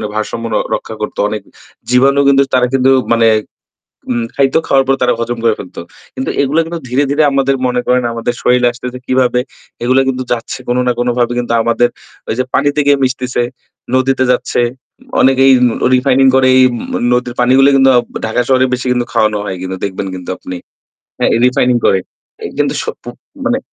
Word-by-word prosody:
ভারসাম্য 110 +2 -3
র - - +1 0.2
রক্ষা 110 - -7
করত। 105 - -5
অনেক 105 0 -4 0.5
জীবাণু 135 +3 +3
কিন্তু 140 0 +5
তারা 125 -1 +3
কিন্তু 135 0 +3 0.2
মানে 115 0 +3 0.8
আম 120 -1 -1
খাইতো 135 +2 +2
খাওয়ার 135 -1 +3
পর 135 - +3
তারা 125 -1 +3
হজম 120 +1 -3
করে 115 -2 +2
ফেলতো। 90 - -8 0.3
কিন্তু 265 +1 -3
এগুলো 140 +3 +1
কিন্তু 170 +1 -5
ধীরে, 130 +4 +1
ধীরে 150 +2 +2
আমাদের 135 0 +1
মনে 125 0 -1
করেন 125 0 +2
আমাদের 115 +1 -2
শরীরে 125 0 +3
আসতেছে 125 +1 -7
কিভাবে 125 -1 +2 0.4
এগুলো 130 +2 +3
কিন্তু 130 -1 -1
যাচ্ছে 120 +2 -3
কোন 120 - +1
না - - +3
কোনভাবে 120 0 0
কিন্তু 120 -1 -2
আমাদের 120 +1 +1 0.4
ঐযে 120 +4 0
পানিতে 145 +2 +1
গিয়ে 145 0 +4
মিশতেছে, 125 -1 -1 0.5
নদীতে 130 0 +1
যাচ্ছে। 125 - 0 0.6
অনেকেই 135 0 +4 0.2
নো 115 - -2
রিফাইনিং 135 +1 +3
করে 130 -1 +4
এই 130 - +6 0.5
নদীর 125 0 -1
পানিগুলো 130 +3 +5
কিন্তু 135 0 +5 0.4
ঢাকা 110 +2 0
শহরে 130 -1 +3
বেশি 125 +1 -3
কিন্তু 125 -1 0
খাওয়ানো 105 -1 +2
হয় 95 - -4
কিন্তু 95 0 -5
দেখবেন 95 0 -4
কিন্তু 90 -1 -9
আপনি। 90 - -7 0.6
হ্যাঁ, - - +1
রিফাইনিং 125 -1 +2
করে। 95 - +3 0.6
কিন্তু - - 0
স - - -6 0.2
পু - - -11 0.4
মানে 255 -1 +1
125 Hz, 175 wpm, -14 LUFS, 120-135 Hz, 0.8 s, এই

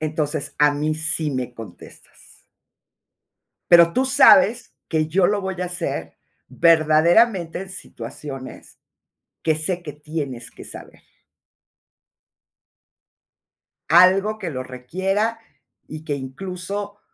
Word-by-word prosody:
"entonces, 155 -1 -3
a 150 0 +5
mí 150 +2 -1
sí 160 -1 0
me 125 -1 -4
contestas". 115 -1 -14 1.3
"pero 170 -1 +7
tú 260 +1 +1
sabes, 265 -4 +5
que 155 -1 0
yo 180 +2 +2
lo 205 -1 0
voy 190 -1 -4
a - - -1
hacer, 165 - -4 0.3
verdaderamente, 165 - +3
en 190 0 -8
situaciones, 135 -4 -9 0.7
que 160 -1 +2
sé, 175 +3 -2
que 150 - -7
tienes 145 -6 -6
que - - -13
saber". - - -12 2.9
"algo 190 +5 +5
que 185 -5 -5
lo 130 -3 -5
requiera, 190 - -2 0.5
y 155 0 -9
que 145 -2 -3
incluso, 190 +9 -6
165 Hz, 110 wpm, -21 LUFS, 150-190 Hz, 2.9 s, pero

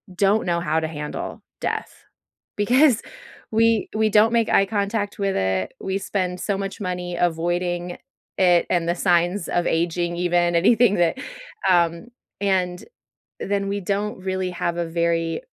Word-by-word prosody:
don't 200 +3 +2
know 170 0 +1
how 160 -1 +1
to 160 - -2
handle 150 -1 -6 0.2
death - - -3 0.6
because 245 +3 +4 0.5
we 225 0 +3
we 220 0 +2
don't 215 +3 +4
make 230 -1 +2
eye 195 - +4
contact 205 +1 -2
with 195 -1 0
it. 95 0 -1
We 190 0 -2
spend 180 -3 -2
so 200 +1 -1
much 195 +2 -5
money 180 -2 -3
avoiding 175 +1 -1 0.4
it 175 -2 +4
and 170 -1 +1
the 175 - +1
signs 175 +1 +1
of 175 - 0
aging 170 +1 0
even, 175 -1 +1
anything 210 +4 +4
that, 170 -2 +2 0.5
um 170 +2 +2 0.3
and 185 -3 0 0.6
then 200 0 -1
we 200 +1 -2
don't 200 +2 -2
really 185 0 -2
have 170 -1 -2
a 175 - -1
very 165 0 0
180 Hz, 150 wpm, -23 LUFS, 170-200 Hz, 0.6 s, because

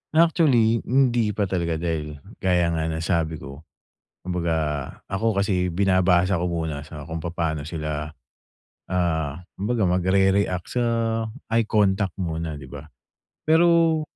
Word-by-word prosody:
Actually 140 -9 +4
hindi 120 -5 +2
pa 105 - +1
talaga 85 -4 -1
dahil 80 -2 -3 0.2
gaya 90 -2 +2
nga 80 -1 -1
ng 80 0 -3
sabi 80 -2 0
ko, 70 0 -9 0.6
kumbaga 85 -2 -1 0.6
ako 100 0 +1
kasi 90 -3 0
binabasa 95 -1 +3
ko 90 - -1
muna 80 -4 -3
sa 75 -1 -9
kung 80 +2 -5
papaano 80 -3 -3
sila, 75 -2 -4 0.9
ah, 80 -5 0 0.2
kumbaga 105 0 0
magrereact 95 0 +2
sa 125 -1 0 0.6
eye 115 0 +2
contact 100 -2 +1
muna 80 -3 -3
'di 65 - -11
ba? 70 +2 -9 0.6
Pero 165 0 +4
90 Hz, 125 wpm, -24 LUFS, 80-105 Hz, 0.9 s, Actually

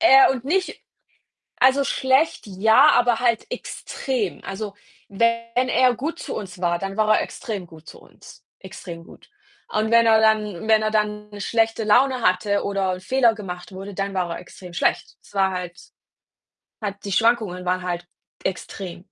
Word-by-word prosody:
er 270 -5 +7
und 260 -2 -3
nicht 365 +6 -1 0.8
also, 265 +2 +4
schlecht 265 +3 +1
ja, 220 +8 +5
aber 245 -1 +3
halt 235 -3 +1
extrem. 245 -9 -4
Also, 200 +1 -6 0.3
wenn 230 +4 0
er 250 -1 +3
gut 315 +8 -4
zu - - -5
uns 185 -3 -7
war, 175 -1 +1
dann 195 +2 -5
war 215 0 +4
er - - 0
extrem 205 -5 -6
gut 160 -1 -16
zu - - -13
uns, - - -17
extrem 170 -2 -9
gut. - - -17 0.4
Und 215 +1 0
wenn 230 0 +5
er 220 -1 +5
dann 215 -3 +1
wenn 220 -1 +4
er 215 - 0
dann 210 -1 -1
schlechte 225 +2 +1
Laune 250 +4 +3
hatte 200 +1 +1
oder 195 -2 -1
‘n 185 - -7
Fehler 240 +3 +3
gemacht 180 -4 -8
wurde, 195 +1 -8
dann 195 0 -3
war 180 -2 -1
er - - -7
extrem 180 0 -12
schlecht. 175 - 0
Es - - -20
war 195 -1 +2
halt 180 -1 -6 1.0
halt 205 -2 -3
die 200 - -4
Schwankungen 215 -4 +1
waren 185 0 0
halt 175 -1 -4 0.4
extrem. 190 -1 -5
210 Hz, 170 wpm, -22 LUFS, 185-230 Hz, 1.0 s, er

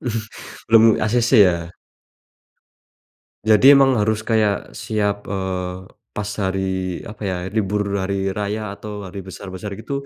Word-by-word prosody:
Mhm, 125 - -3 0.6
belum 115 0 +6 0.2
acc 120 +3 +1
ya? 90 -6 +4 1.7
Jadi 110 +6 +7
emang 135 -3 +4
harus 110 +1 0
kayak 110 -3 0
siap, 105 -2 -1
eee, 95 -1 -4 0.3
pas 105 0 -3
hari, 95 0 -1 0.5
apa 110 - -11
ya, 95 - -1 0.2
libur 105 -1 0 0.2
hari 95 0 -1
raya 105 +2 -3 0.2
atau 105 -1 -7
hari 95 +2 -8
besar-besar 95 +1 -7
gitu 140 - -8
105 Hz, 125 wpm, -21 LUFS, 95-110 Hz, 1.7 s, Jadi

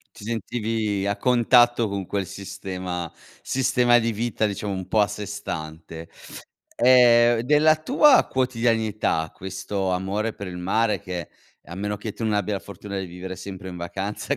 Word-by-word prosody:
Ti - - -11
sentivi 110 -2 -2
a 100 - -1
contatto 120 -1 +4
con 100 -1 -3
quel 100 0 -3
sistema 90 -3 -6 0.3
sistema 125 -2 +3
di 115 0 +1
vita 110 0 -1
diciamo 100 0 -3
un 95 -1 -4
po' 110 - +1
a 105 - +4
sé 105 +1 -6
stante. 80 -4 -7 0.7
Ehm, 120 -1 +6
della 150 +5 +4
tua 270 - +5
quotidianità 115 -9 0
questo 95 +1 -4
amore 100 +4 -1
per 100 - -8
il 90 - -7
mare 105 +5 +1
che 90 -4 -6 0.4
a 85 - -10
meno 105 +1 -3
che 105 0 -6
tu 115 - -7
non 110 - 0
abbia 105 0 0
la 95 - -3
fortuna 100 0 -7
di 95 - -5
vivere 90 +2 -7
sempre 95 0 -8
in 90 - -8
vacanza, 100 +10 -3
105 Hz, 165 wpm, -24 LUFS, 95-115 Hz, 0.7 s, Ehm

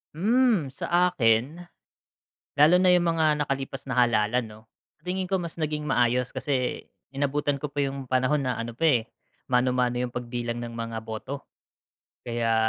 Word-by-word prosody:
Hmm, 215 - +2
sa 175 +5 +1
akin, 135 +7 +1 0.9
lalo 155 +5 +7
na 185 - +5
'yung 180 -1 +4
mga 155 -3 +2
nakalipas 135 0 -4
na 130 - -3
halalan, 120 0 +2
'no, 110 -1 -11 0.4
sa - - -40
tingin 185 +1 -2
ko 190 - +2
mas 170 -2 -5
naging 150 -2 -3
maayos 125 -1 +1
kasi 130 -3 -1 0.3
inabutan 145 0 -1
ko 150 - -3
pa 145 - -8
'yung 135 -2 -2
panahon 130 +3 +2
na 125 -3 -2
ano 115 0 -5
pa, 125 - -12
eh, 130 -8 +4 0.4
mano-mano 125 -1 +1
'yung 125 - -3
pagbilang 120 -1 -4
ng 120 -1 -6
mga 115 -1 -4
boto. 125 +6 -6 0.8
Kaya, 115 -1 0
135 Hz, 160 wpm, -26 LUFS, 120-155 Hz, 0.9 s, lalo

